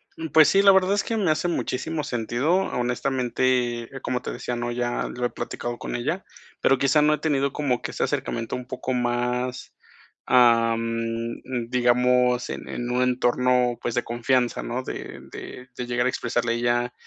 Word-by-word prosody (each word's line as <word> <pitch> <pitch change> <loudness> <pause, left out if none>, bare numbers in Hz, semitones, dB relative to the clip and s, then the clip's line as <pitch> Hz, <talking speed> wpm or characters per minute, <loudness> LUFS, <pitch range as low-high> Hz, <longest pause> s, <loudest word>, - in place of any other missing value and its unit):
Mm, 160 - -5
pues 155 +1 +7
sí, 195 - +5
la 200 - +8
verdad 190 0 +4
es 205 - +1
que 225 - -2
me 185 -7 +2
hace 155 +3 0
muchísimo 160 -1 -2
sentido. 120 +4 -1
Honestamente, 125 -4 0
eh, 135 - -7
como 125 0 -2
te - - -5
decía, 125 - -4
¿no?, 120 0 -3
ya 120 0 -1
lo 125 0 -3
he - - +1
platicado 120 0 -5
con - - -5
ella, 150 +10 -2 0.4
pero 135 - +4
quizá 140 +3 +3
no 150 +1 +4
he 150 - 0
tenido 140 -2 0
como 135 -5 0
que - - -5
ese - - -2
acercamiento 115 -1 -2
un 125 - -6
poco 130 0 -4
más, 125 +1 -1 0.5
am, 115 -2 +4 0.6
mm, 120 -3 -4
digamos, 125 0 +2
en - - -6
en 120 0 -4
un 125 +1 +1
entorno, 125 -1 +2
pues, 120 - -2
de 120 - +1
confianza, 120 +1 0
¿no?, 125 +2 -3
de - - -7
de 125 0 -9
de 125 - -3
llegar 120 0 0
a - - +3
expresarle 120 -1 -1
a - - -1
ella, 120 +1 0
125 Hz, 190 wpm, -24 LUFS, 120-135 Hz, 0.6 s, la